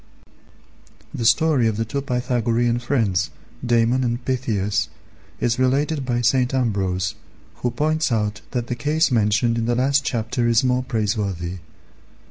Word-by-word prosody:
The 115 - 0
story 130 +1 +3
of 110 -2 -1
the 115 - -1
two 140 +5 -3
Pythagorean 120 -2 0
friends, 110 -8 0 0.3
Damon 120 +1 +2
and 120 0 -2
Pythias, 105 -6 -1 0.5
is 120 +1 0
related 135 +2 +1
by 120 -1 0
St. 125 +2 +2
Ambrose, 95 -7 0 0.4
who 125 - -1
points 155 +2 0
out 105 -2 -1
that 120 -2 -2
the 125 - -3
case 150 +5 +1
mentioned 115 +1 +2
in 115 - -1
the 120 - +1
last 135 +3 +2
chapter 120 0 -1
is 115 +1 +3
more 125 0 +2
praiseworthy. 100 -6 -2
120 Hz, 140 wpm, -22 LUFS, 110-130 Hz, 0.5 s, story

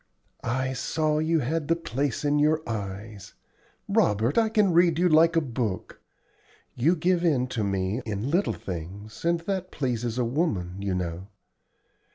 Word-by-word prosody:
"I 130 +2 -1
saw 155 +3 0
you 160 0 +2
had 150 +4 -1
the 165 - +3
place 145 -4 -2
in 145 0 +2
your 155 +1 +2
eyes. 105 -2 -6 0.5
La, - - +4
Robert! 110 +6 0
I 225 -1 +3
can 210 -4 +3
read 170 -1 +4
you 180 +1 +3
like 165 +1 +5
a 165 - +4
book. 115 - -4 0.7
You 155 +9 +2
give 175 +1 +1
in 145 -7 +2
to 115 -4 -2
me 100 +3 -1
in 110 +4 -3
little 185 +5 +2
things, 95 +5 -7
and 170 0 +1
that 185 +1 -3
pleases 120 -4 -2
a 125 - +1
woman, 110 - -1
you 100 -2 -1
know. 90 +1 -4
130 Hz, 165 wpm, -26 LUFS, 105-165 Hz, 0.7 s, like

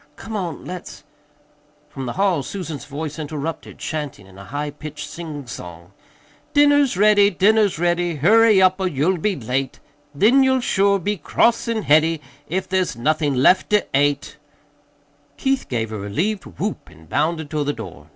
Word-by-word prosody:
"Come 220 - -8
on, 180 -6 -4
let's 180 -1 -8 0.4
" 150 0 -36
From 135 -2 -6
the 120 - -3
hall 190 -6 +1
Susan's 155 0 -6
voice 150 +2 -6
interrupted, 155 +1 -5
chanting 150 -10 -5
in 95 -1 -17
a 100 0 -11
high 145 +8 -4
pitched 150 0 -8
singsong: 120 - -8 0.6
"Dinner's 290 -6 +4
ready, 205 0 +5
dinner's 205 +1 +3
ready, 175 0 0
Hurry 215 +7 +5
up, 185 0 +4
or 190 - 0
you'll 170 +3 0
be 200 +3 0
late, 130 0 -3 0.4
Then 230 - +5
you'll 265 -1 +3
sure 200 -4 +2
be 205 +3 -2
cross 230 +10 +1
and 225 -2 -1
heady 160 +2 +3 0.3
If 185 +4 -2
there's 185 -6 0
nothin' 145 +1 0
left 185 +5 +4
to 210 -1 +3
ate." 145 +1 +1 1.0
Keith 270 0 0
gave 115 -3 -2
a 110 - -4
relieved 175 - -2
whoop 85 - -5
and 80 +1 -18
bounded 160 - -1
toward 150 -2 -1
the 145 - +1
door. 110 - -10
160 Hz, 160 wpm, -21 LUFS, 145-200 Hz, 1.0 s, ready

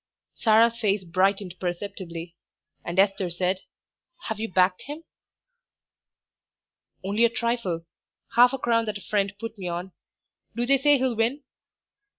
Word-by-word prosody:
Sarah's 230 +1 +4
face 205 -3 +1
brightened 185 +1 0
perceptibly, 175 -2 -5 0.5
and 170 +1 -5
Esther 195 -1 +3
said 180 +2 0 0.7
"Have 220 -1 -3
you 225 +1 -3
backed 185 0 +3
him?' 300 +3 -7 2.0
"Only 205 +4 +1
a 235 - +6
trifle; 230 -8 -2 0.5
half 245 +1 +7
a 270 - -2
crown 230 -2 +1
that 210 -1 -3
a - - -13
friend 200 -2 0
put 230 0 -6
me 185 - -4
on. 175 +2 -4 0.6
Do 240 +1 0
they 275 +2 +4
say 290 +1 +5
he'll 255 -2 0
win?" 240 +6 0
205 Hz, 140 wpm, -25 LUFS, 185-235 Hz, 2.0 s, half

